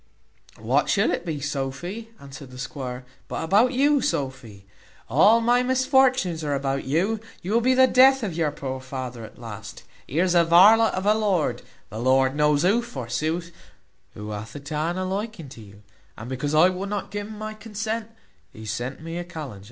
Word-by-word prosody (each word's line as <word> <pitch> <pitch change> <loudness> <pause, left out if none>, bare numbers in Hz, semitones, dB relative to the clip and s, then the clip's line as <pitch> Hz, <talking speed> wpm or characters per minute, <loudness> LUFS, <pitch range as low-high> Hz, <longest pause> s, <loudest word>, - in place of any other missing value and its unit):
"What - - 0
should - - +2
it 175 - -3
be, 155 -3 -3
Sophy," 150 +10 -4
answered 140 -1 -11
the 125 - -12
squire, 125 -1 -6 0.2
"but - - -4
about 205 +9 +3
you, 280 +2 +3
Sophy? 130 - -4 0.4
All 200 - +5
my 240 +2 +3
misfortunes 255 -8 +2
are 145 -1 -1
about 135 0 -2
you; 185 +11 0 0.2
you 185 - -4
will 235 - +3
be 255 +2 +3
the 260 0 +7
death 265 0 +5
of 195 -6 -2
your 160 -2 0
poor 130 -2 -5
father 130 -3 -6
at 110 - -12
last. 110 -3 -9 0.2
Here's 175 +5 +1
a 170 -1 +5
varlet 205 +7 +6
of 185 +1 -3
a 210 - +5
lord, 185 - 0 0.3
the 110 - -6
Lord 130 +2 +2
knows 150 0 +2
who, 205 +6 +3
forsooth! 160 - -3 0.6
who 105 +1 -7
hath 105 +4 -7
a - - -5
taan 155 +5 -3
a 185 - -2
liking 195 -5 -4
to 120 - -12
you, 100 0 -15 0.3
and 110 - -8
because 145 +4 -2
I 165 +4 +6
would 185 +2 -4
not 205 0 -4
gi 205 - -3
un 210 +1 -8
my 215 0 -5
consent, 220 +1 -4 0.4
he 110 - -11
sent 125 +8 -4
me 165 +1 -5
a - - -4
kallenge. 155 - -8
165 Hz, 190 wpm, -24 LUFS, 130-215 Hz, 0.6 s, the